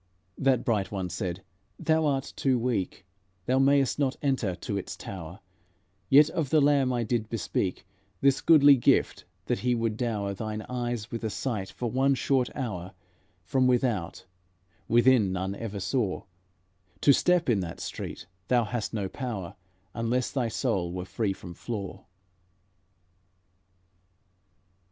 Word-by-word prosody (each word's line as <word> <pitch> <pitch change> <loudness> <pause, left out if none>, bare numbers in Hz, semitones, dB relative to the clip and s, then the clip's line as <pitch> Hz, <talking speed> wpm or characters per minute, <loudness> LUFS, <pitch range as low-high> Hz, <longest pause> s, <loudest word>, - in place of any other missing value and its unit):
That 135 -3 +2
bright 105 -5 0
one 95 -3 -3
said, 90 +1 -4 0.3
"Thou 160 -1 +2
art 135 -1 -1
too 130 -2 +2
weak, 115 -6 -2 0.4
Thou 130 +2 +2
may'st 140 0 +3
not 135 -2 +1
enter 130 -10 0
to 100 - -5
its 100 - -4
tower; 90 0 -8 0.7
Yet 145 +2 +7
of 160 -6 -1
the 155 - +4
Lamb 140 -2 +3
I 120 -1 0
did 115 -1 -1
bespeak 95 -3 -2 0.3
This 140 -1 +3
goodly 145 -4 +7
gift, 120 - +2 0.2
that - - -1
He 125 0 +1
would 115 -2 -1
dower 105 -5 -1
Thine 110 +1 -4
eyes 120 -3 -4
with 115 - -4
the 110 - -2
sight 105 -4 -3
for 120 -2 -4
one 135 +2 +3
short 130 -1 +1
hour, 95 -6 -4 0.5
From 130 +4 +2
without, 120 -8 0 0.6
within 120 -4 +4
none 95 +1 -2
ever 105 -1 -5
saw; 105 0 -1 0.8
To 140 - +6
step 180 +3 +2
in 115 -5 +3
that 85 -3 -5
street - - -6 0.2
thou 125 -2 +3
hast 115 0 -3
no 100 -3 -1
power, 100 -6 -5 0.4
Unless 120 +2 -1
thy 130 -4 0
soul 90 -5 -1
were 90 0 -4
free 105 +1 -1
from 90 -2 -8
flaw." 100 -1 -6
115 Hz, 145 wpm, -28 LUFS, 100-130 Hz, 0.8 s, Yet